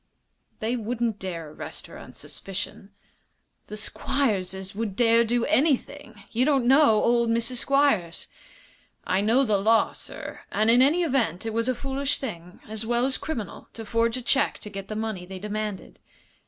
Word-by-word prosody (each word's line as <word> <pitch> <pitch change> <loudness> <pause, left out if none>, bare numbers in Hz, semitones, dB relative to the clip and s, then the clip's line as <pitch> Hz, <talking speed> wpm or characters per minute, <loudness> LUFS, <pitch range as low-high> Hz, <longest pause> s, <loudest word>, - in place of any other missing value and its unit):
"They 225 +3 0
wouldn't 230 -1 -2
dare 165 -5 -5
arrest - - -8
her - - -12
on - - -11
suspicion." 195 0 -7 0.8
"The 210 - -7
Squierses 195 -6 -1
would 210 -2 -3
dare 230 0 +5
do 235 +1 +1
anything. 270 -6 0
You 235 +3 +2
don't 275 -3 +2
know 265 -4 +5
old 235 -1 +3
Mrs. 235 +2 +1
Squiers." 275 -12 +2 0.8
"I 185 +1 +1
know 230 +6 +3
the 215 -5 +2
law, 220 +3 +3
sir, - - -8
and 215 +2 +3
in 245 +2 +6
any 310 +7 +4
event 235 - 0
it 225 - -2
was 230 +2 0
a 255 - +1
foolish 275 +2 -1
thing, 180 -9 -7
as 220 +1 -4
well 240 +2 +1
as 265 0 0
criminal, 235 - -5
to 225 - -7
forge 230 +2 +1
a 255 - -6
check 275 +4 +2
to 210 - -8
get 195 -1 -6
the 215 - -5
money 215 -5 -3
they 190 0 -7
demanded." 210 0 -5
225 Hz, 170 wpm, -26 LUFS, 205-255 Hz, 0.8 s, in